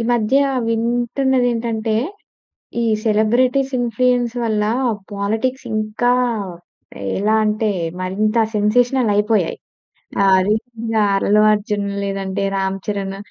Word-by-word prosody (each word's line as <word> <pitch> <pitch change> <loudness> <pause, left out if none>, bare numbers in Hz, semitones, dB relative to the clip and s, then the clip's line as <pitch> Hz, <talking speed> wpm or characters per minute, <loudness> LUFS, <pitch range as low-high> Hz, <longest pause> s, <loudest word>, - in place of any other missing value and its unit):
ఈ - - 0
మధ్య 235 +3 +2 0.3
వింటున్నదేంటంటే, 235 -1 0 0.9
ఈ - - +1 0.2
సెలబ్రిటీస్ 250 +5 +2
ఇన్‌ఫ్లుయెన్స్ 245 0 +1
వల్ల 215 -2 0 0.5
పాలిటిక్స్ 225 +7 -2
ఇంకా, 215 +3 0 1.1
ఎలా 215 +3 +2
అంటే 215 0 0 0.3
మరింత 205 +4 -1 0.2
సెన్సేషనల్ 240 +3 +2
అయిపోయాయి. 210 -4 +1 0.6
ఆ! - - +4 0.2
రీసెంట్‌గా 225 0 -1 0.2
అల్లు 210 +2 +3
అర్జున్ 205 -1 -1 0.2
లేదంటే 195 0 -3
రామ్ 195 0 -1
చరణ్ 195 -2 -3
220 Hz, 95 wpm, -19 LUFS, 210-245 Hz, 1.1 s, ఆ